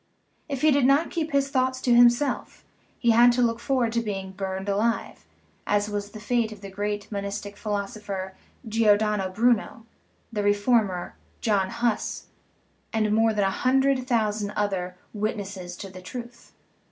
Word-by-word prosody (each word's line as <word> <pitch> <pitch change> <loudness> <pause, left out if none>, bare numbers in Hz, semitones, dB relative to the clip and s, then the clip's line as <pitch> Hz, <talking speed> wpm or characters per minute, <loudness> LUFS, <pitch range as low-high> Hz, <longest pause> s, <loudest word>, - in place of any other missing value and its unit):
If 275 -2 -3
he 310 - +6
did 280 -2 +4
not 280 +4 +3
keep 320 -2 -2
his 280 -1 +2
thoughts 260 -1 +1
to 245 - +3
himself, 240 +4 +3 0.3
he 235 -3 +3
had 240 +2 +7
to 250 - +1
look 230 -1 +1
forward 255 -4 0
to 235 - +1
being 195 -3 -4
burned 190 0 -4
alive, 215 +3 -1 0.4
as 205 0 +1
was 205 0 -3
the 215 - -10
fate 230 0 0
of 210 -2 -10
the 195 -1 -8
great 205 +1 -3
monistic 200 0 -4
phi 215 - -7
losopher, 200 -2 -3 0.4
Giordano 210 -3 +2
Bruno, 225 +2 +1 0.5
the 210 - -1
reformer, 205 -2 +1 0.2
John 200 -4 +1
Huss, 235 -1 -1 0.7
and 215 -1 +1
more 225 +1 +4
than 210 -2 +1
a 195 - +1
hundred 265 +2 +2
thousand 215 -4 0
other 190 -3 -1
" - - -37
witnesses 195 -4 -4
to 195 - -8
the 185 0 -10
truth." 240 +4 -9
215 Hz, 165 wpm, -25 LUFS, 200-240 Hz, 0.7 s, had